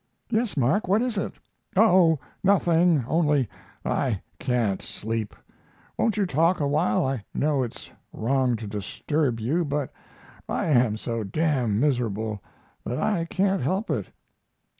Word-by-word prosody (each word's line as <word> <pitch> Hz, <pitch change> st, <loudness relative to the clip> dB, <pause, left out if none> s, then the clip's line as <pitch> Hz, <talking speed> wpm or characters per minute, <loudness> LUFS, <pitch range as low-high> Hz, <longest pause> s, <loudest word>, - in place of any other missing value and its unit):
"Yes, 225 Hz, -4 st, 0 dB
Mark, 140 Hz, -, +2 dB
what 205 Hz, +5 st, +3 dB
is 250 Hz, -3 st, -1 dB
it?" 195 Hz, -, -2 dB, 0.4 s
"Oh, 180 Hz, -6 st, +6 dB, 0.3 s
nothing, 175 Hz, -, +3 dB
only 150 Hz, -6 st, +2 dB, 0.4 s
I 120 Hz, -8 st, 0 dB, 0.2 s
can't 115 Hz, -6 st, 0 dB
sleep. 110 Hz, -1 st, -4 dB, 0.6 s
Won't 225 Hz, -2 st, +1 dB
you 205 Hz, -, +2 dB
talk 165 Hz, +2 st, +2 dB
awhile? 155 Hz, +5 st, +1 dB
I 130 Hz, -5 st, -2 dB
know 145 Hz, -2 st, +1 dB
it's 120 Hz, -3 st, -6 dB, 0.2 s
wrong 130 Hz, +1 st, +1 dB
to 110 Hz, 0 st, -6 dB
disturb 115 Hz, +6 st, -2 dB
you, 145 Hz, +11 st, 0 dB
but 145 Hz, -2 st, -2 dB, 0.6 s
I -, -, -1 dB
am 120 Hz, -6 st, +3 dB
so 115 Hz, 0 st, -3 dB
d 100 Hz, +9 st, -5 dB
d 145 Hz, -7 st, +2 dB
miserable 110 Hz, -3 st, 0 dB, 0.4 s
that 125 Hz, -, -3 dB
I 185 Hz, -6 st, 0 dB
can't 190 Hz, +2 st, +1 dB
help 190 Hz, -, -1 dB
it." -, -, -1 dB
145 Hz, 140 wpm, -25 LUFS, 115-175 Hz, 0.6 s, Oh